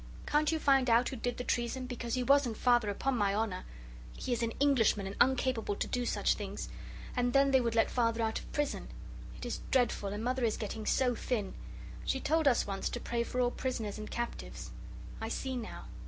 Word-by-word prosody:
Can't 300 +1 +2
you 320 - +1
find 270 -4 +3
out 235 +2 +4
who - - -5
did 245 0 -2
the 250 - -3
treason 245 +2 -1
because 240 -1 -3
he 255 - 0
wasn't 270 -3 +3
Father 240 -4 +3
upon 260 +6 0
my 200 -3 +2
honour; 210 -4 -1 0.5
he 250 - -2
is 240 - -1
an 230 - +1
Englishman 250 -8 +3
and 195 +1 -5
uncapable 255 -5 +2
to - - -1
do 245 -1 -1
such - - +2
things, - - -5 0.5
and 245 -1 +1
then 275 0 +5
they 265 -1 +5
would 230 -1 -1
let 225 - +3
Father 230 -2 +1
out 220 0 0
of - - -12
prison. 295 -1 -1 0.5
It - - -7
is 240 - -3
dreadful, 245 -6 +2
and 205 +2 -4
Mother 255 +1 0
is 225 -2 +1
getting 215 0 -5
so 255 -2 +3
thin. 220 -4 -2 0.5
She 265 - 0
told 315 +2 +2
us 250 -3 +4
once 195 -1 -2
to 240 - -4
pray 235 0 -1
for 245 +2 -2
all 245 -1 +3
prisoners 225 -6 -3
and 215 - -6
captives. 235 0 -5 0.5
I 225 - -3
see 260 +2 -3
now. 235 -3 -6
240 Hz, 215 wpm, -32 LUFS, 225-260 Hz, 0.5 s, then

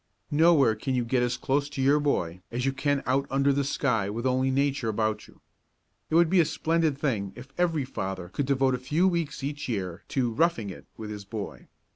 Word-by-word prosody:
Nowhere 150 -5 +5
can 130 +5 -2
you 125 -1 0
get 125 +1 +1
as 125 +1 0
close 140 +3 0
to 145 - -7
your 140 +3 +4
boy 90 - -1
as 125 +2 -2
you 135 - +1
can 140 0 0
out 135 +2 +1
under 140 +1 +2
the 140 +1 +1
sky 125 -7 0
with 115 +4 -4
only 130 +1 +2
Nature 135 -2 +1
about 110 0 -1
you. - - -20 0.7
It 160 - 0
would 170 0 +6
be 185 +2 +3
a - - +7
splendid 160 -2 0
thing 110 -10 -1
if 125 +3 -11
every 165 -6 +1
father 95 -7 -5
could 135 +7 -2
devote 135 -1 +2
a 125 - -1
few 155 +8 +2
weeks 160 -5 -1
each 145 0 -4
year 95 -5 -3
to 125 -3 0
"roughing 115 - +1
it" - - -12
with 110 -1 -6
his 105 -1 -6
boy. 105 +1 -7
135 Hz, 215 wpm, -27 LUFS, 115-145 Hz, 0.7 s, a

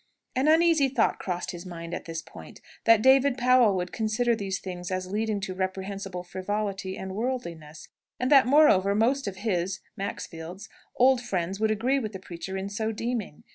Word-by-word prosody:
An 260 +3 +2
uneasy 320 -2 +5
thought 245 -4 +1
crossed 180 -1 -3
his 175 -1 -8
mind 170 -2 -7
at - - -5
this 165 -1 -5
point, - - -12 0.3
that 230 -2 +6
David 265 0 +5
Powell 250 -4 +4
would 180 -1 -2
consider 230 +2 +1
these 195 -3 -3
things 180 -1 -6
as 185 0 -3
leading 215 0 -1
to 195 -1 -4
reprehensible 190 0 -4
frivolity 195 +1 -3
and 190 0 -6
worldliness; 170 -10 -5 0.3
and 255 +3 0
that, 270 -3 +7
moreover, 200 -9 +5
most 255 +5 +2
of 195 - -4
his 185 -2 0 0.2
(Maxfield's) 185 0 -6 0.3
old 255 0 +4
friends 190 -4 -2
would 220 0 +2
agree 240 +6 +1
with 215 -4 -5
the 190 - -6
preacher 185 +1 -6
in 190 +1 -3
so 220 +2 -2
deeming. 225 -6 -4
200 Hz, 175 wpm, -27 LUFS, 185-245 Hz, 0.3 s, that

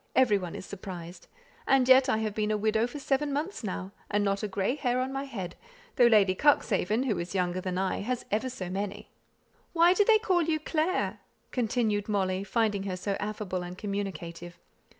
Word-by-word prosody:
Every 235 -6 +4
one 180 -3 -6
is - - -7
surprised. 180 -3 -8 0.4
And 265 -2 +4
yet 260 0 +7
I - - +2
have 220 -1 -2
been 210 0 -1
a 215 - +1
widow 220 +2 +1
for 270 - -8
seven 285 +1 0
months 300 +4 -3
now: 190 -1 -4 0.2
and 205 0 +1
not 195 0 0
a 210 - -1
grey 200 +3 0
hair 255 -3 0
on 260 +1 -2
my 270 +1 -3
head, 190 -10 -6 0.4
though 240 - +6
Lady 205 -5 +5
Cuxhaven, 220 -3 +2
who 215 -9 0
is 175 +3 -5
younger 180 0 0
than 185 -1 -3
I, 190 0 0
has 245 +4 -3
ever 220 +5 0
so 195 -8 -6
many." 205 +3 -5 0.6
"Why 340 +1 +6
do 415 - +4
they 440 +1 +6
call 375 -5 +1
you 320 -1 0
'Clare?'" 320 +4 -1 0.3
continued 220 -4 0
Molly, 190 -2 0
finding 210 -1 0
her 185 -2 -3
so 200 +2 -2
affable 205 -3 -3
and 180 +1 -7
communicative. 175 -4 -5
210 Hz, 195 wpm, -29 LUFS, 190-260 Hz, 0.6 s, yet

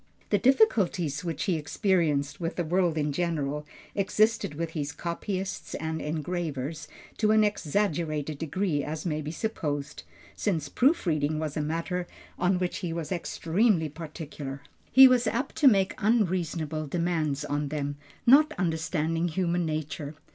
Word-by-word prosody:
The 205 - +4
difficulties 190 - +3
which 165 -2 -3
he 185 - +1
experienced 150 -3 0
with 165 +1 -2
the 175 - -1
world 170 0 +1
in 150 -1 0
general 150 -2 -2 0.3
existed 205 -4 +1
with 165 +1 -3
his 145 -3 -3
copyists 185 +4 -4
and 160 0 -3
engravers 155 -1 -3 0.3
to 215 - +2
an 215 0 +5
exaggerated 160 -6 -1
degree 160 -1 -1
as 155 +2 -5
may 155 -3 -1
be 150 - -5
supposed, 150 -6 -3 0.3
since 160 -8 -1
proofreading 160 - +2
was 155 -2 -3
a 155 - 0
matter 170 +4 -2 0.3
on 180 +1 +2
which 180 -1 -2
he 175 -4 -3
was 165 0 -4
extremely 175 0 +1
particular. 150 -3 -7 0.3
He 265 0 +10
was 250 -2 +3
apt 240 +5 -1
to 300 - +5
make 195 -6 +4
unreasonable 175 -8 0
demands 160 -3 -1
on 145 0 -1
them, 145 -1 -3 0.3
not 300 +5 +6
understanding 165 -1 0
human 175 0 0
nature. 155 -1 -4
165 Hz, 140 wpm, -28 LUFS, 150-190 Hz, 0.3 s, He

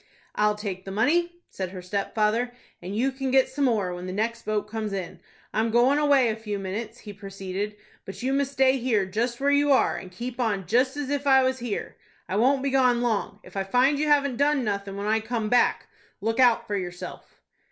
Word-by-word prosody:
"I'll 210 0 +2
take 200 -3 -5
the 195 - -8
money," 310 - +1 0.2
said 185 -2 -4
her 185 0 -8
stepfather, 215 +5 0 0.3
"and 185 +3 -6
you 265 +4 +2
can 265 0 -3
get 265 0 +4
some 285 +1 0
more 205 -8 +1
when 175 +1 -6
the - - -4
next 230 +3 -2
boat 215 -1 0
comes 215 -1 -4
in. 185 -2 -5 0.3
I'm 220 +2 +1
goin' 245 +5 +4
away 280 -5 +4
a 220 - -1
few 215 -2 -4
minutes," 210 +5 -5
he 210 - -9
proceeded; 195 +1 -5 0.3
"but 195 +5 -9
you 265 +1 +1
must 275 0 0
stay 265 0 +4
here 230 -5 +1
just 235 +5 -2
where 280 +1 +2
you 285 0 +3
are, 265 - +3
and 185 - -9
keep 240 +6 -6
on 205 -6 0
just 255 - +2
as 285 -1 -3
if 285 0 -1
I 265 -1 +6
was 260 0 0
here. 235 -3 -4 0.3
I 185 - -3
won't 265 +4 +3
be 275 - 0
gone 250 -3 +3
long. 215 -3 -1
If - - -15
I 195 - 0
find 255 +8 +2
you 305 - +1
haven't 280 -4 +3
done 285 -1 +2
nothing 200 -2 -3
when 200 - -4
I 220 +1 +2
come 220 -1 -3
back, 245 +1 +3 0.3
look 225 +3 -1
out 245 -3 +5
for 205 - -3
yourself." 180 -1 -7
230 Hz, 220 wpm, -26 LUFS, 200-265 Hz, 0.3 s, I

